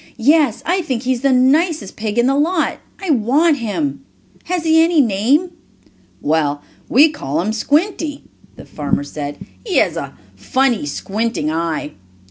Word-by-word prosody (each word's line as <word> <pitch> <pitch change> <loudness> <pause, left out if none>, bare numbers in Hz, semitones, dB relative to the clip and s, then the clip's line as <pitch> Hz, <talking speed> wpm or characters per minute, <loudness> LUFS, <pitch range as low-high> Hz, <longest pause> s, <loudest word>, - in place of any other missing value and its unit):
"Yes, 275 -1 +3
I 365 +2 +1
think 260 -8 -3
he 260 0 +1
is 240 - -5
the 275 0 +2
nicest 275 - +2
pig 215 0 -4
in 240 - +4
the 270 - +3
lot. 315 +4 0 0.2
I 380 -4 -1
want 285 +6 +3
him. 260 +5 -3 0.4
Has 355 -2 -2
he 320 0 +4
any 330 -1 +3
name?" 260 - +2 0.7
"Well, 145 -1 0 0.3
we 290 +6 +6
call 145 - -3
him 205 +6 -1
Squinty," 300 - -1 0.3
the - - -12
farmer 145 -1 -2
said. 145 0 -6 0.3
"He 415 -7 -1
has - - +2
a - - -6 0.2
funny, 255 - 0
squinting 200 0 -2
eye." 160 -2 -2
260 Hz, 155 wpm, -18 LUFS, 200-315 Hz, 0.7 s, we